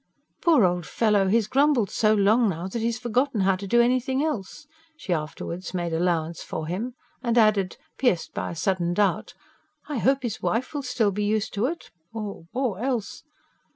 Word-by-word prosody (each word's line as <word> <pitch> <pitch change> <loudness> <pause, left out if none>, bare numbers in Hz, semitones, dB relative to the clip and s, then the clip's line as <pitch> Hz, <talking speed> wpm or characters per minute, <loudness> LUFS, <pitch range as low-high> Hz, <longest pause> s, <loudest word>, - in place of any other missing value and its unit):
"Poor 320 - +5
old 175 -2 0
fellow, 210 -4 +2
he's 220 +2 +3
grumbled 270 -2 +2
so 215 -1 +2
long 215 +3 +4
now, 175 0 -3
that 225 +4 -4
he's 230 +1 0
forgotten 245 -1 0
how 190 0 +3
to 195 +2 -7
do 240 +5 +3
anything 255 +3 +2
else," 300 0 -4 0.3
she 190 - -2
afterwards 170 +3 -5
made 175 -2 -2
allowance 165 -1 0
for 160 - -5
him. 215 +10 -4 0.3
And 240 -2 0
added, 215 -4 +3 0.2
pierced 215 -11 +1
by - - -3
a - - -6
sudden 175 -1 0
doubt: 205 0 0 0.5
"I 295 -5 -2
hope 270 +2 +2
his 230 -3 -3
wife 250 +6 -1
will 290 - -2
still 240 -5 +1
be 205 +2 -2
used 215 0 0
to 215 +4 +1
it, 335 +4 -6 0.2
or... 205 -6 -6
or 245 -7 -1
else 245 -4 -2
215 Hz, 185 wpm, -25 LUFS, 185-245 Hz, 0.5 s, Poor